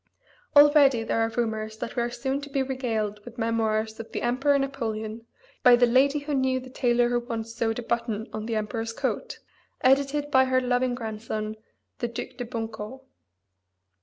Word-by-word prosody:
Already 290 -5 +7
there 225 - -1
are 225 - +2
rumors 220 -2 -2
that 230 - -5
we 240 - +1
are 235 - 0
soon 265 +3 -2
to 285 - -8
be 275 -1 0
regaled 225 -6 -2
with 240 +1 -11
Memoirs 220 -1 0
of 225 - -8
the - - -4
Emperor 270 +4 +2
Napoleon 230 -5 -3 0.3
by 245 -1 +8
the 245 0 +5
Lady 265 +4 +4
who 290 0 -4
knew 260 -1 +1
the 255 0 -11
Tailor 240 -2 +2
who 240 0 +1
Once 230 -2 -5
Sewed 225 -1 -1
a 245 - -4
Button 230 -2 -2
on 215 0 -4
the 230 - -1
Emperor's 225 +1 -2
Coat, - - -3 0.4
edited 280 +2 +2
by 260 -1 +5
her 260 0 +2
loving 250 0 +1
grandson, 220 -2 -4 0.4
the 240 - -1
Duc 235 +1 -5
de 245 - -4
Bunco. 225 +2 -6
240 Hz, 180 wpm, -26 LUFS, 225-260 Hz, 0.4 s, by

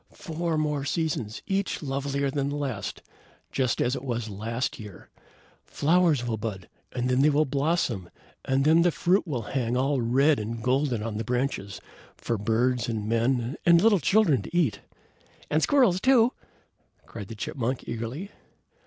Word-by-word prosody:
"Four 165 -1 -3
more 150 -2 -1
seasons, 140 -8 -2
each 195 -3 -2
lovelier 140 0 -1
than 140 0 -1
the 145 - -3
last, 135 -9 -4 0.5
just 130 -3 0
as 125 +2 +1
it 130 - -6
was 120 -4 -3
last 115 +7 -3
year. 105 -4 -11 0.5
Flowers 160 -4 +2
will 115 -2 -2
bud, 100 -4 -5 0.2
and 125 -1 -2
then 125 +1 +2
they 150 - +5
will 150 +1 +3
blossom, 135 - -1 0.3
and 135 +1 +1
then 160 +2 +5
the 175 - +4
fruit 180 +3 +1
will 125 -7 -2
hang 120 +1 -1
all 135 0 +1
red 135 +6 +3
and 110 +1 -5
golden 130 -3 +1
on 110 -2 -4
the 110 - -2
branches, 120 -5 -2 0.4
for 115 -3 -2
birds 120 +4 +1
and 110 -2 -3
men 120 +3 0
and 170 -1 +6
little 205 +1 +4
children 175 - +3
to 175 - -5
eat." 120 - +1 0.7
"And 155 +2 +2
squirrels, 235 - +3
too!" 250 -2 +4 0.7
cried 100 -4 -8
the 115 - -8
chipmunk, 125 +3 -3
eagerly. 120 - -5
135 Hz, 160 wpm, -26 LUFS, 115-155 Hz, 0.7 s, and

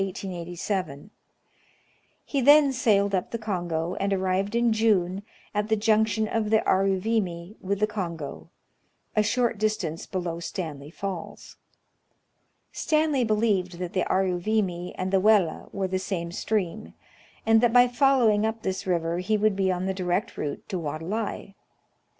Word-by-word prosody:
He 275 - -1
then 285 +1 +6
sailed 200 -5 +2
up 185 -2 0
the 230 - -3
Kongo, 175 -6 -2
and 200 0 0
arrived 190 +2 0
in 235 -1 +3
June 200 -4 +2 0.3
at 210 0 -1
the 220 - +4
junction 220 0 +2
of 215 -1 -1
the 220 0 +2
Aruvimi 190 -1 0
with 200 +1 -2
the 215 - +4
Kongo, 170 -8 -5 0.7
a 215 - +4
shoi't 230 +1 0
distance 200 -7 -2
below 175 -3 -3
Stanley 155 -5 -5
Falls. 185 0 -7 1.1
Stanley 305 -4 +1
believed 210 -5 +1
that 180 -1 -5
the 185 - 0
Aruvimi 185 -1 0
and 185 +1 -3
the 195 - +5
Welle 200 -5 +2
were 195 -1 -2
the 185 0 -1
same 170 -3 -3
stream, 210 +1 -2 0.5
and 225 0 +5
that 240 -1 +4
by 245 +1 +6
following 245 -5 +3
up 220 +1 -2
this 190 0 -3
river 170 -1 0
he 215 +4 +1
would 210 -1 +2
be 190 -1 +1
on 180 0 -2
the 190 - -1
direct 185 +3 -2
route 145 - -5
to 185 - -2
Wadelai. 175 +7 -4
195 Hz, 145 wpm, -26 LUFS, 180-220 Hz, 1.1 s, then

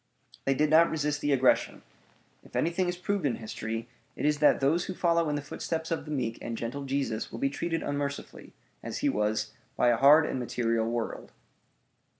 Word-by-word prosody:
They 135 - +2
did 150 +2 +2
not 165 +2 +6
resist 150 -1 -1
the 145 - 0
aggression. 130 -2 +2 0.6
If - - -16
anything 175 +2 +1
is 175 - -3
proved 200 +1 -2
in 135 -5 +1
history, 115 +1 -5 0.3
it - - -3
is 150 0 +2
that 150 - +5
those 155 +6 +2
who 185 - -5
follow 170 -2 +2
in 150 - 0
the 145 - -3
footsteps 160 +2 -4
of 165 - -2
the 150 - -7
meek 125 -6 -2
and 115 -1 -4
gentle 130 +5 -4
Jesus 135 -5 -2
will - - -6
be 135 +4 +1
treated 165 +2 -2
unmercifully, 145 0 -4 0.3
as - - -5
he - - +4
was, 105 0 -1 0.2
by 120 - +4
a 120 - +3
hard 145 +5 +7
and 130 - -2
material 115 -2 0
world. 115 -1 -4
140 Hz, 195 wpm, -29 LUFS, 115-160 Hz, 0.6 s, hard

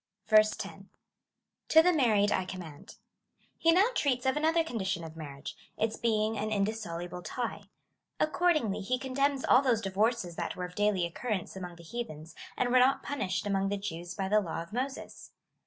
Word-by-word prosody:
10. 215 -1 +2 0.8
To 320 0 +7
the 360 +1 +4
married 215 -9 +3
I 185 - +1
command. 175 -6 -9 0.6
He 330 - +5
now 380 +7 +5
treats 260 - 0
of 265 - +2
an 300 - -1
otlier 325 +1 +3
condition 195 - -2
of 160 -1 -9
marriage 145 -3 -8
— - - -38
its 220 0 0
being 220 -1 +1
an 215 +1 -1
indissoluble 195 -5 -2
tie. 240 +6 -4 0.5
Accordingly, 305 - +1
lie 255 - +2
condemns 270 +1 0
all 255 - +6
those 250 -5 +2
divorces 200 -2 0
tliat - - -3
were 180 - -4
of 180 - -9
daily 205 -3 +1
occurrence 195 +2 -3
among 180 -2 -7
the 170 - -14
heathens, 165 -6 -7 0.2
and 250 - +1
were 255 - +6
not 260 +2 +4
punished 200 -9 -2
among 195 -1 0
the 205 - -1
Jews 175 -3 -6
by 195 -2 -2
the 210 +2 +4
law 165 -3 -4
of 170 - -16
Moses. 265 +3 -5
215 Hz, 180 wpm, -30 LUFS, 180-255 Hz, 0.8 s, To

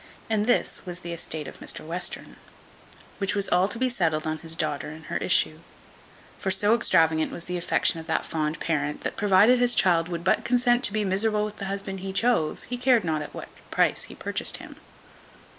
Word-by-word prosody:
And 215 0 +1
this 245 - +1
was 180 -1 -7
the 170 -1 -5
estate 160 -2 -4
of - - -11
Mr - - -5
Western; 175 +3 -2 0.8
which 200 +1 -1
was 200 -1 +1
all 180 +2 +3
to 230 - -4
be 255 +2 +1
settled 165 -10 0
on 155 0 -2
his 165 -1 -3
daughter 150 -3 -2
and 155 +1 -11
her - - -3
issue; - - +2 0.8
for 195 - -2
so 205 +3 +3
extravagant 160 -8 +3
was 170 - -6
the 180 - -4
affection 170 -1 +1
of 160 - -10
that 160 - -1
fond 155 0 -2
parent, 150 -2 -2
that, - - -4
provided 205 +5 +4
his 245 0 +3
child 170 -2 +3
would 170 -1 -4
but 185 - +2
consent 245 0 +2
to 205 - -1
be 215 -1 0
miserable 210 +2 +1
with 210 0 -7
the 195 - -5
husband 195 0 -3
he 190 0 -5
chose, 225 -8 +2
he 245 - -5
cared 250 -3 +3
not 160 -3 -1
at 150 - -8
what - - -8 0.2
price - - +1
he - - -12
purchased - - -2
him. - - -12
185 Hz, 210 wpm, -25 LUFS, 160-210 Hz, 0.8 s, provided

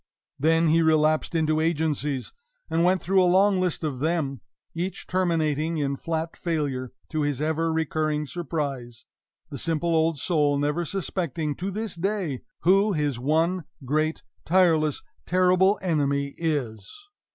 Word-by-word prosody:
Then 165 +3 +3
he 165 +2 +4
relapsed 155 0 +2
into 155 -1 +2
agencies, 150 -4 -1 0.4
and 165 +1 +2
went 185 +1 +2
through 190 +1 +3
a - - +4
long 190 +1 +4
list 180 -2 -1
of 145 -5 -2
them, 150 -3 -1 0.3
each 175 +2 -4
terminating 165 -3 0
in 140 -2 -1
flat 160 +2 -3
failure, 145 -7 -2 0.2
to 155 -2 -1
his 145 -3 -1
ever 160 +2 0
recurring 155 -1 -1
surprise 140 -7 -4 0.5
the 140 - -5
simple 165 0 0
old 160 -1 +2
soul 145 -1 +1
never 150 +4 0
suspecting, 165 -4 -3
to 190 +2 -3
this 210 +1 -3
day, 180 -6 -2 0.2
who 195 +4 +4
his 145 -6 -1
one 160 +5 +1 0.2
great 155 +4 0 0.2
tireless, 160 -4 +2 0.2
terrible 185 +2 +4
enemy 140 -5 0
is! 130 - -2
160 Hz, 140 wpm, -25 LUFS, 145-175 Hz, 0.5 s, he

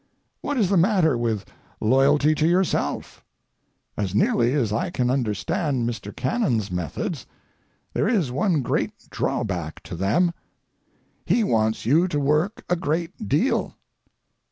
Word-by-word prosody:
What 290 - -2
is 205 -7 +2
the 195 - +3
matter 175 - +3
with 115 -4 -1 0.3
loyalty 140 +6 +4
to 155 +1 +1
yourself? 180 +2 0 0.7
As 100 -2 -2
nearly 120 +4 +2
as 115 -8 0
I 115 +12 -1
can 125 -8 0
understand 130 - -1
Mr. 110 -4 -5
Cannon's 125 - 0
methods, 90 -4 -4 0.7
there - - +1
is 195 - +1
one 150 +2 +1
great - - -1 0.2
drawback 85 -7 -3
to - - -7
them. 110 - +2 0.9
He 235 - +2
wants 110 - +1
you 160 +9 +4
to 150 -5 -1
work 150 +8 0
a 180 - +2
great 165 - -3
deal. - - +1
140 Hz, 130 wpm, -24 LUFS, 110-175 Hz, 0.9 s, loyalty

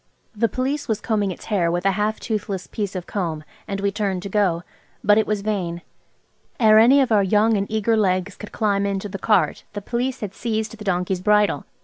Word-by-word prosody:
The 230 +2 +1
Police 270 +7 -2
was 220 -3 0
combing 210 -4 0
its 185 - -7
hair 190 -6 +1
with 175 +2 -2
a 195 - +4
half 210 +2 -1
toothless 205 -4 -3
piece 205 -3 -4
of 180 -1 -4
comb, 165 -6 -3 0.2
and 200 -2 -3
we 200 0 0
turned 195 -3 -2
to 200 - -5
go. 185 -4 +1 0.4
But 210 0 +5
it 220 - 0
was 210 -1 -1
vain. 180 -5 -2 0.8
Ere 215 -2 +6
any 260 +5 +6
of 260 - 0
our 210 -2 +5
young 210 +3 +3
and 200 -1 -1
eager 220 +1 +1
legs 185 -2 0
could 210 - -10
climb 200 -2 0
into 200 0 -2
the 195 0 -6
cart 210 -2 +1
the 205 - -3
Police 250 +5 -2
had 205 -3 -5
seized 220 -1 -3
the 215 - -10
donkey's 180 -1 -1
bridle. 210 +1 +2
205 Hz, 215 wpm, -22 LUFS, 190-220 Hz, 0.8 s, Ere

